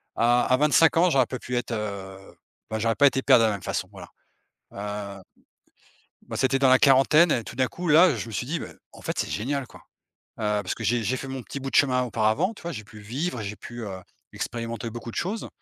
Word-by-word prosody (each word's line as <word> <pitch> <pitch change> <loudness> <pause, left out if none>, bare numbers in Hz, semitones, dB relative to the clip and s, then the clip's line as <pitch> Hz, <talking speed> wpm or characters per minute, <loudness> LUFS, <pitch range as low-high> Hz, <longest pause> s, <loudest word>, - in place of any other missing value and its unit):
À 120 +1 +3
à 130 - +3
25 150 +3 +4
ans 180 +2 +5
j'aurais 135 -6 +3
pas 130 - -4
pu 125 - -5
être, 120 - -3
heu. 100 -3 -5 0.5
Bah, 110 - -3
j'aurais 115 +1 +1
pas 145 - +6
été 135 -1 +1
père 125 - +6
de 115 - +3
la 110 - +2
même 100 -2 -5
façon - - -3
voilà. - - -11 0.7
Heu 100 -1 -6 1.1
bah, - - -5
c'était 135 0 +2
dans 135 -1 +4
la 130 0 +6
quarantaine 145 +5 +5
et 120 - +1
tout - - -10
d'un 130 +1 +1
coup 175 +8 -6
là 165 +4 +6
je - - -5
me 115 - -8
suis 110 - -3
dit: 165 +6 -2
«Beh, - - -7 0.2
en - - -15
fait - - -4
c'est - - -1
génial, 135 +5 -2
quoi. - - -15 0.6
Heu, 105 -1 0
parce 95 - -3
que 110 - -7
j'ai 115 +2 +1
j'ai 130 +6 -1
fait 135 - -7
mon 135 -1 -5
petit 140 - -7
bout 135 0 -5
de - - -3
chemin 130 -3 +4
auparavant, 115 - 0
tu - - -15
vois? 170 - -5
J'ai 110 -9 -7
pu 105 +1 -14
vivre, 125 +6 -4
j'ai 105 0 -5
pu, 120 +4 -10
heu, 95 -3 -6 0.3
expérimenter 115 -1 -4
beaucoup 120 +1 -8
de - - -12
choses 210 +5 -3
120 Hz, 245 wpm, -25 LUFS, 110-140 Hz, 1.1 s, pas